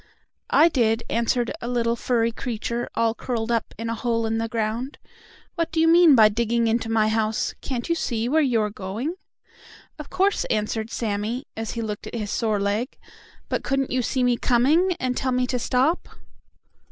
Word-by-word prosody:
"I 325 - +6
did," 235 -7 +1
answered 235 +1 +1
a 235 - -4
little, 235 -1 0
furry 235 -1 0
creature, 235 0 -4
all 230 -1 +2
curled 235 -1 -3
up 230 -1 -1
in 230 - -4
a 230 - -1
hole 230 0 -1
in 225 0 -1
the 225 - -1
ground. 225 +4 -3 0.6
"What 335 -2 -2
do 320 - -1
you 325 - +4
mean 335 -3 +7
by 220 -3 +7
digging 235 +2 0
into 225 0 0
my 220 -1 +2
house? 220 0 0
Can't 250 -3 -4
you 335 - +2
see 235 -8 -2
where 315 +5 +3
you 245 -6 +2
are 210 -1 -1
going?" 210 - -4 0.9
"Of 300 - -8
course," 395 +2 +1
answered 220 +1 -1
Sammie, 225 +4 -3
as 225 0 -4
he 230 - -3
looked 210 -1 -5
at - - -7
his 210 -3 -3
sore 220 -3 0
leg. 205 +6 -2 0.5
"But - - -2
couldn't 270 -1 -1
you 255 - +1
see 255 +2 0
me 245 -1 +2
coming, 300 +12 +3
and 255 -1 -1
tell 260 +1 -1
me 250 0 +1
to 250 0 -2
stop?" 260 +8 +1
235 Hz, 190 wpm, -24 LUFS, 225-255 Hz, 0.9 s, mean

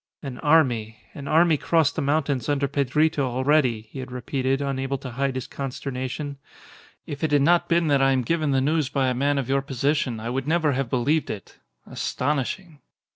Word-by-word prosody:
"An 130 -3 -6
army 125 -9 +2 0.2
an 140 -1 -8
army 160 +1 +4
crossed 160 -1 +2
the - - -1
mountains 140 -3 0
under 140 -1 +1
Pedrito 145 +3 +1
already," 130 -2 +2
he 135 - -7
had 130 -1 -7
repeated, 130 +1 -1
unable 135 -1 -2
to 130 -1 -8
hide 135 +2 -1
his 130 - -3
consternation. 135 +1 -5 0.7
"If 145 +2 -7
it 160 - +2
had 145 -1 +4
not 175 +3 +3
been 170 0 +3
that 140 -1 +3
I 135 0 +4
am 130 -1 +1
given 155 +2 0
the 135 -1 +2
news 150 0 +1
by 135 -2 +1
a - - 0
man 140 +3 +1
of 135 -3 -1
your 135 0 +1
position 135 -2 -1
I 115 +2 -4
would 135 +2 -3
never 160 -2 +2
have 135 -2 -1
believed 140 +6 +1
it. 100 - -8 0.3
Astonishing!" 150 +4 -3
140 Hz, 190 wpm, -24 LUFS, 130-150 Hz, 0.7 s, army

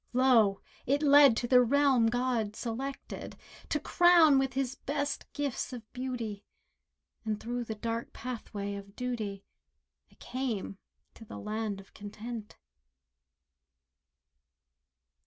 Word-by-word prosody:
Lo! 235 -6 +4 0.3
it 285 +4 +2
led 285 -4 +7
to 240 - -1
the 250 0 +6
realm 265 -1 +4
God 235 -3 0
selected 255 +5 -5 0.3
To 300 - +1
crown 330 -3 +6
with 270 0 0
His 265 -1 -1
best 285 +1 -3
gifts 285 -3 -3
of 240 -3 -7
beauty, 240 -5 -4 0.8
And 215 -2 -2
through 240 +2 -3
the 220 - -4
dark 230 +2 -4
pathway 210 -5 -5
of 200 0 -9
duty 220 -6 -4 0.7
I - - -22
came 235 -6 -4 0.3
to - - -13
the 220 - -9
land 215 -1 -3
of 195 - -16
Content. 215 +2 -8
240 Hz, 120 wpm, -30 LUFS, 215-270 Hz, 0.8 s, led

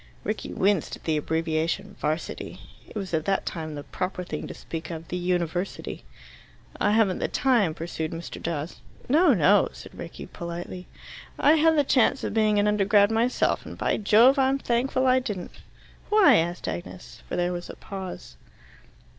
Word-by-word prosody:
Rickie 215 +1 -3
winced 195 -3 +1
at - - -18
the 160 - 0
abbreviation 160 +5 -1
"'Varsity." 155 +2 -3 0.3
It - - -15
was 195 -4 -5
at 160 -1 0
that 195 -1 0
time 155 -3 -5
the 145 - -6
proper 185 +2 -4
thing 155 -4 -5
to - - -7
speak 165 -1 -7
of 165 -1 -7
"the - - -3
University." 180 0 -2 0.8
"I 205 - +2
haven't 215 -4 +3
the - - 0
time," 230 - +2
pursued 160 -1 -4
Mr. 165 +1 -7
Dawes. 165 -1 -4 0.3
"No, 305 0 +5
no," 195 +4 +4
said - - -12
Rickie - - -8
politely. 175 +1 -7 0.5
"I 295 - +5
had 320 0 +4
the 290 - +5
chance 260 0 +2
of - - -2
being 215 -1 +3
an 205 0 +3
Undergrad, 205 0 +4
myself, 230 +3 +1
and, - - -9
by - - 0
Jove, 230 +6 +5
I'm 270 0 +3
thankful 260 +1 0
I 255 0 +5
didn't!" 210 -8 -5 0.6
"Why?" 390 - +6
asked 175 +2 -1
Agnes, 175 +1 -7
for - - -2
there 175 0 0
was 175 0 -6
a - - -7
pause. 190 -2 -8
195 Hz, 170 wpm, -26 LUFS, 170-230 Hz, 0.8 s, Why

